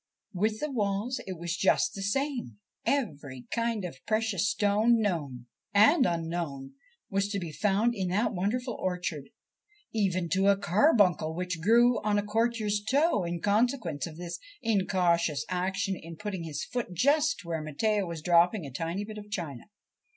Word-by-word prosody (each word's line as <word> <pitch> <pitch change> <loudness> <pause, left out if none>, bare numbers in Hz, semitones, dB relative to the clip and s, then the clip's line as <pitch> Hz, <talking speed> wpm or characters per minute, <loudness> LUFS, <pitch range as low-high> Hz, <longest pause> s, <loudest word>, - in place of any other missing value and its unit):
With 215 +4 0
the 300 -1 -3
walls 210 +1 -1
it 185 -2 -5
was 170 +1 -3
just 195 - +2
the 195 - -6
same. 240 - -2 0.3
Every 145 - -2
kind 230 -4 -1
of 130 -7 -8
precious 215 -3 +1
stone 210 +4 +3
known 150 - -2 0.3
and 255 +7 +6
unknown 165 -5 -3 0.4
was 195 +1 +1
to 200 -1 -2
be 170 -4 -5
found 210 +7 +1
in 190 -4 -2
that 205 +7 +1
wonderful 235 +7 -1
orchard, 180 -7 -3 0.6
even 185 -5 0
to 190 +4 +2
a 200 -1 +5
carbuncle 190 - +3
which 180 -1 -3
grew 235 +5 +4
on 210 -1 +1
a 205 - 0
courtier's 215 -1 0
toe 265 - +2
in 170 0 -3
consequence 205 - +1
of 160 -1 -10
his 175 -1 -6 0.2
incautious 175 -8 +1
action 190 +2 -1
in 165 -1 -9
putting 195 -4 -4
his 155 -1 -4
foot 245 -7 -4
just 290 - +2
where 165 -2 -2
Matteo 200 +7 0
was 165 -2 -6
dropping 175 +2 +3
a 140 - -7
tiny 165 +8 -3
bit 215 0 -8
of 205 0 -12
china. 165 -11 -5
195 Hz, 160 wpm, -29 LUFS, 170-220 Hz, 0.6 s, and